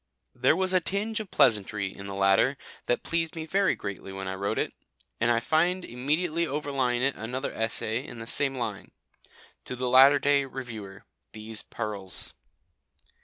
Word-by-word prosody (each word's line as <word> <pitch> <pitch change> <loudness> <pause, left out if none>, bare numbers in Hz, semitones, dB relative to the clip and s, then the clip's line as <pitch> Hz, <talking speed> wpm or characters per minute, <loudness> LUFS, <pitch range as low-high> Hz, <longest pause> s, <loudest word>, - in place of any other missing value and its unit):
There - - +3
was 185 +1 0
a 185 - +5
tinge 205 +6 -1
of 215 -3 -6
pleasantry 105 - +2
in 100 - -8
the 100 - -5
latter 95 +8 +3 0.3
that 120 - +1
pleased 165 -1 -1
me 160 -1 -4
very 195 +4 +2
greatly 100 -1 -6
when 95 0 -5
I 95 - -2
wrote 100 +1 -2
it, - - -1 0.5
and 115 - +2
I 115 -1 +4
find 175 +8 +1
immediately 155 +7 -1
overlying 135 -4 -1
it 135 0 +2
another 125 +5 -4
essay 115 +1 -1
in 120 - -10
the 115 - -7
same 135 +3 +3
line 110 -6 -5 0.7
To 125 - -4
the 125 0 -2
Latter 135 +3 +8
day 140 0 +3
Reviewer, 115 -7 -8 0.3
These 110 0 -5
Pearls. 105 -4 -4
125 Hz, 170 wpm, -27 LUFS, 110-155 Hz, 0.7 s, Latter